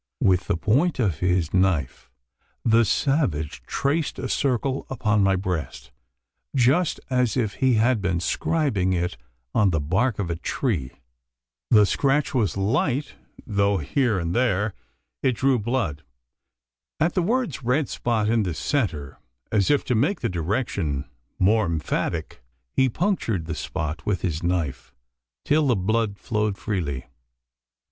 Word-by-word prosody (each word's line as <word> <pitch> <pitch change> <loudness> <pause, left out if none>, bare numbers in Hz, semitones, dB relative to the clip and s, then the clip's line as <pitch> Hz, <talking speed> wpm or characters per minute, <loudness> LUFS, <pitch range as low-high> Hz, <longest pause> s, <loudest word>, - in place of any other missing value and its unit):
With 90 -2 +3
the - - +1
point 140 - +2
of 95 - 0
his 90 -3 +1
knife, 90 -8 0 0.6
the 115 0 +5
savage 100 - 0
traced 145 +3 -1
a 130 - -3
circle 135 0 0
upon 110 -5 +1
my 95 0 +3
breast 90 -7 -4 0.6
just 140 +7 +3
as 125 -1 +1
if 110 -5 0
he 130 -2 +4
had 115 0 +2
been 90 -3 0
scribing 100 - 0
it 90 +1 -1 0.4
on 105 -2 +4
the 80 -3 +1
bark 95 - +1
of 90 -4 -2
a - - -1
tree. 85 - -2 0.8
The 105 -2 +6
scratch 140 +6 +1
was 105 - +1
light, 130 +7 0 0.3
though 100 -2 +1
here 115 - +1
and 85 -1 -2
there 105 -4 +1 0.5
it 130 - +2
drew 130 +1 +2
blood. 105 - -1 1.0
At 170 +3 +2
the 185 - +1
words 220 - 0
"red 130 +3 +1
spot 110 -3 -1
in 115 +1 +2
the 90 -5 -2
centre," 75 - -2 0.3
as 100 -3 +2
if 145 - +3
to 125 - 0
make 145 - +1
the - - 0
direction 85 - -2 0.3
more 105 +2 +3
emphatic, 80 0 -2 0.3
he 130 0 +3
punctured 115 - -1
the 80 - -4
spot 80 0 -4
with 95 -4 -1
his 85 -3 -1
knife 85 -7 -2 0.5
till 150 0 +3
the 125 - +3
blood 105 +1 0
flowed 105 -3 -1
freely. 80 - -3
105 Hz, 145 wpm, -24 LUFS, 90-130 Hz, 1.0 s, The